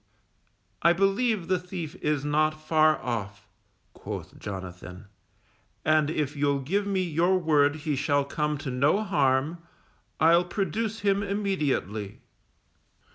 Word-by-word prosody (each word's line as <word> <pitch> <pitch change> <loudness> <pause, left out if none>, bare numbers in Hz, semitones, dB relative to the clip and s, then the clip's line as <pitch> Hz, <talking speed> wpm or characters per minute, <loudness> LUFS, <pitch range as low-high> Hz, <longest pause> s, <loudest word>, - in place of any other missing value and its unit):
I 170 +1 +5
believe 195 +1 +1
the 185 -1 +1
thief 180 -4 -6
is 150 -1 0
not 155 +1 +1
far 155 0 +3
off_, 105 -5 -4 0.5
quoth - - -8
Jonathan, 90 -1 -8 0.8
_and 155 -1 +3
if 150 -2 -2
you'll 140 -1 +1
give 200 +9 -1
me 190 -2 0
your 175 +2 +2
word 150 -4 +3
he 155 -1 -2
shall 145 0 +1
come 150 +1 -1
to 135 - -2
no 145 +11 +2
harm, 145 -3 +1 0.6
I'll 170 +2 +5
produce 215 +4 -2
him 200 -1 +2
immediately. 150 - -2
155 Hz, 125 wpm, -27 LUFS, 140-185 Hz, 0.8 s, I